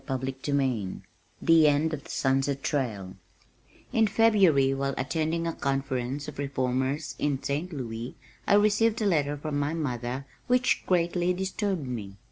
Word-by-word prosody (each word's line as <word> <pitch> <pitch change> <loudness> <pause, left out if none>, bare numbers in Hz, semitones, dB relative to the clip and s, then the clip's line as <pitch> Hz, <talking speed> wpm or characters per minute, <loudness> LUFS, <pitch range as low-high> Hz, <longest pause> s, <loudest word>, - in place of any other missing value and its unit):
CHAPTER 130 -2 -2
XXXIII 130 -7 -1 0.4
The 165 -2 +6
End 150 +2 +2
of 145 -2 -5
the - - -13
Sunset 135 +1 0
Trail 105 -10 -2 0.8
In 225 -1 +4
February 190 -12 +4
while 135 0 -2
attending 160 +4 -1
a 165 - -1
conference 135 0 -2
of 145 -2 -8
reformers 130 +1 -1
in 140 -2 -1
St. 150 +6 -2
Louis 120 -4 -5 0.3
I 200 - +5
received 215 +2 +3
a - - +1
letter 145 -6 +1
from 145 0 -3
my 145 +3 -1
mother 130 -3 -3 0.2
which 250 +1 +2
greatly 175 0 +1
disturbed 190 -3 -2
me. 110 -6 -5
145 Hz, 145 wpm, -27 LUFS, 130-170 Hz, 0.8 s, The